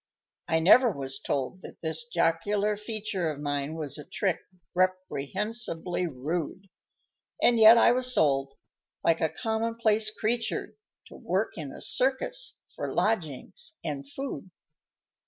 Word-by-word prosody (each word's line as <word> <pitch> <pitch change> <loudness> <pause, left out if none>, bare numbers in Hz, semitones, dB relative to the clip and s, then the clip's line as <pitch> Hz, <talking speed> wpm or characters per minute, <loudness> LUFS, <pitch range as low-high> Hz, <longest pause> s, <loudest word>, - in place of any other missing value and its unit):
_ - - +2
_I 160 - +2
never 245 +8 +7
was 135 -5 -3
told 140 +7 -3
that - - -11
this 160 +9 -2
jocular 200 +3 +1
feature 210 -5 -3
Of 150 -2 -5
mine 145 +1 -2
was 155 -2 -4
a - - -7
trick 190 +3 -1 0.3
reprehensibly 185 +1 0
rude, 165 +7 -4 0.7
And 235 -1 +4
yet 220 +1 +9
I 235 - +6
was 255 +1 +1
sold, 135 - +2 0.5
like 165 -1 +2
a 160 - +2
commonplace 225 0 0
creature, 225 +2 -2 0.4
To - - -12
work - - -1
in - - -6
a - - -10
circus 445 - 0 0.2
for - - -4
lodgings 210 - -2
and 140 -4 -5
food. 270 - -6
185 Hz, 135 wpm, -28 LUFS, 155-225 Hz, 0.7 s, yet